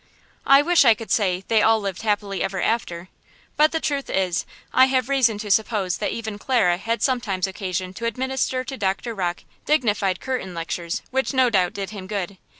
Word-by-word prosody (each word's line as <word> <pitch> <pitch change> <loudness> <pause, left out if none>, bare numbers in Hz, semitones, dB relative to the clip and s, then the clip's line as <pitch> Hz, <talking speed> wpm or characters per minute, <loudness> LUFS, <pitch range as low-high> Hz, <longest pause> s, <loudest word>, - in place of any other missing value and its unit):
I 275 +1 +7
wish 345 0 +5
I 230 -4 +6
could 225 0 -9
say 185 -3 +1
"they 225 -2 +3
all 225 +1 +4
lived 195 -3 -4
happy 205 -2 -1
ever 195 0 -2
after." 180 -4 -2 0.5
But 305 +1 +4
the 320 - -1
truth 285 -3 -2
is 185 -2 0 0.3
I 260 - +7
have 260 -1 0
reason 255 -6 +3
to 210 -1 -4
suppose 200 -3 +1
that - - -2
even 220 -2 -5
Clara 205 -9 +2
had 230 +5 -2
sometimes 215 -8 0
occasion 185 -1 -4
to 230 - -6
administer 260 +2 -1
to 265 +1 -7
Doctor 195 +3 -2
Rocke 180 -4 -3 0.2
dignified 210 - +1
curtain 250 -9 -4
lectures, 170 0 -4
which 265 +1 -1
no 255 -2 +4
doubt 185 -4 +2
did 195 0 -5
him 195 -3 -8
good. 195 -2 -4
210 Hz, 190 wpm, -23 LUFS, 190-255 Hz, 0.5 s, I